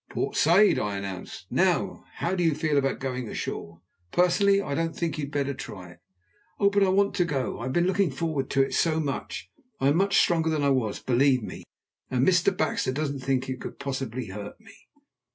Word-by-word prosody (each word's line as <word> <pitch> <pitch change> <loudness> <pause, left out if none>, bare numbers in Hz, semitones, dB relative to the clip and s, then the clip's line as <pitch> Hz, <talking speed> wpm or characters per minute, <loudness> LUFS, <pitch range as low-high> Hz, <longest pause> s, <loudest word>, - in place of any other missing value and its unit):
"Port - - -3
Said," 185 +7 +5
I 100 -1 -2
announced. 95 -2 -7
"Now, - - +1
how 175 - -1
do 180 -2 0
you 165 -3 +2
feel 155 -1 0
about 135 -1 0
going 125 -3 -4
ashore? 85 0 -5 0.3
Personally, 195 +3 +4
I 195 - -3
don't 165 +2 -1
think 165 -4 -1
you 145 - -1
had 140 - -11
better 140 -1 -1
try 95 -8 -9
it." 85 - -18 0.6
"Oh! 200 -1 +4
but 200 0 +2
I 195 - +4
want 200 +1 +2
to 180 - +4
go. 140 -6 -2
I 120 - -4
have 130 - -3
been 175 0 +2
looking 190 -1 +2
forward 145 -1 -2
to 135 0 +3
it 135 - -4
so 160 -1 +2
much. 140 -4 -4 0.3
I 135 - +3
am 145 - +3
much 195 +2 +3
stronger 165 -2 +3
than 155 -2 0
I 140 - +3
was, 120 -6 0
believe 130 0 +2
me, - - -8 0.4
and 130 0 +1
Mr. 180 0 +4
Baxter 155 -4 0
doesn't 140 0 -2
think 130 0 -1
it 130 -1 -5
could - - -7
possibly 130 -3 -4
hurt 100 - -8
me." 220 -2 -16
140 Hz, 215 wpm, -26 LUFS, 130-175 Hz, 0.6 s, Said